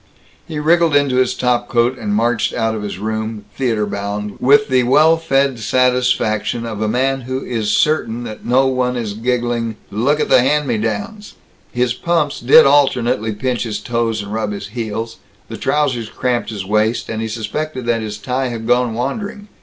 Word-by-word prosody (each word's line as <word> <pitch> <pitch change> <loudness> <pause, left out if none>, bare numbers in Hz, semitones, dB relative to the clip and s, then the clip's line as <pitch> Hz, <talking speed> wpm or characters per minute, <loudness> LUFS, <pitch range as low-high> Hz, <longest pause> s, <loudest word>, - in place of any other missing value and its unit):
He 160 -3 -5
wriggled 165 0 +3
into 140 -3 +2
his 130 0 +2
top 125 -1 0
coat 120 +2 +2
and 105 -4 -3
marched 115 +1 +1
out 115 -1 0
of 110 - -4
his 105 -3 -5
room, 110 0 -4
theater 115 -5 0
bound, 100 0 -4
with 140 +2 +4
the 130 -1 +3
well 150 +6 +5
fed 135 -5 +1
satisfaction 125 -1 +1
of 110 -2 -5
a 110 - +1
man 130 +4 0
who 130 +2 -4
is 110 -4 -2
certain 120 -4 +1
that 110 -3 -8
no 130 +3 +3
one 125 -1 0
is 110 -4 -3
giggling, 120 0 -1 0.2
"Look 135 +9 +1
at - - 0
the - - +5
hand 145 +3 +1
me 115 -4 0
downs." 115 - -4 0.4
His 125 -1 0
pumps 165 0 -1
did 120 +3 +7
alternately 125 -6 +2
pinch 125 +3 -2
his 105 -3 -3
toes 115 -1 -1
and 100 +1 -7
rub 110 -2 -2
his 100 0 -7
heels; 115 0 -4 0.3
the - - -6
trousers 130 -7 0
cramped 125 0 -1
his 100 -4 -5
waist; 110 +3 0
and 110 0 -4
he 110 - -2
suspected 120 +5 -4
that 115 -1 +1
his 105 -1 -5
tie 130 +4 -2
had 115 -2 -5
gone 125 -1 +2
wandering. 205 - -4
120 Hz, 185 wpm, -18 LUFS, 110-130 Hz, 0.4 s, did